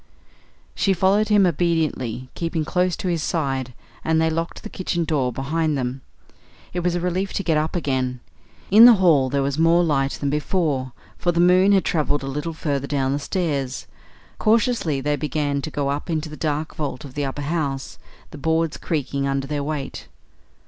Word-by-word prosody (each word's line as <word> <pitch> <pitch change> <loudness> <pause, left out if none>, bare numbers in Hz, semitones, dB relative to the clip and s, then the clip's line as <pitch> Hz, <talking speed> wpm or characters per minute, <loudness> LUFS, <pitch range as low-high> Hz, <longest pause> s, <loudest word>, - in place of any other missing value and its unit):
She 195 - +2
followed 195 +4 +2
him 205 -2 +5
obediently, 155 -8 0
keeping 165 -2 -2
close 180 +1 +1
to - - -4
his 170 -3 0
side, 135 -7 -2 0.3
and 160 0 +2
they 160 0 +2
locked 165 +1 -3
the 215 - -6
kitchen 175 -2 -2
door 140 -6 0
behind 150 +4 -1
them. 130 +1 -3 0.7
It 180 - -1
was 175 0 0
a - - 0
relief 180 +2 -1
to 195 - -2
get 165 -4 +1
up 155 +2 0
again. 130 -6 -1 0.5
In 220 +4 +10
the 240 -1 +9
hall 160 -9 +4
there 140 +1 0
was 140 +2 -1
more 165 +2 +4
light 140 -4 +1
than 140 -1 -2
before, 150 -4 -1 0.3
for 175 - +2
the 170 - -1
moon 180 +3 +5
had 195 -2 +3
travelled 150 -4 0
a - - -4
little 150 +4 -3
further 140 -3 -2
down 135 -2 0
the 140 - -1
stairs. 140 -5 -2 0.5
Cautiously 215 - +2
they 145 +1 0
began 145 -2 -1
to 155 - -4
go 145 -2 -2
up 145 +5 -3
into 160 -1 -2
the 150 - -8
dark 155 0 -2
vault 145 -1 -4
of 135 - -10
the 145 0 -2
upper 135 +2 -4
house, 140 -3 -3 0.3
the 150 - -9
boards 160 +1 0
creaking 140 -3 -2
under 135 0 -1
their 145 +1 -2
weight. 145 -2 -5
155 Hz, 190 wpm, -22 LUFS, 140-170 Hz, 0.7 s, In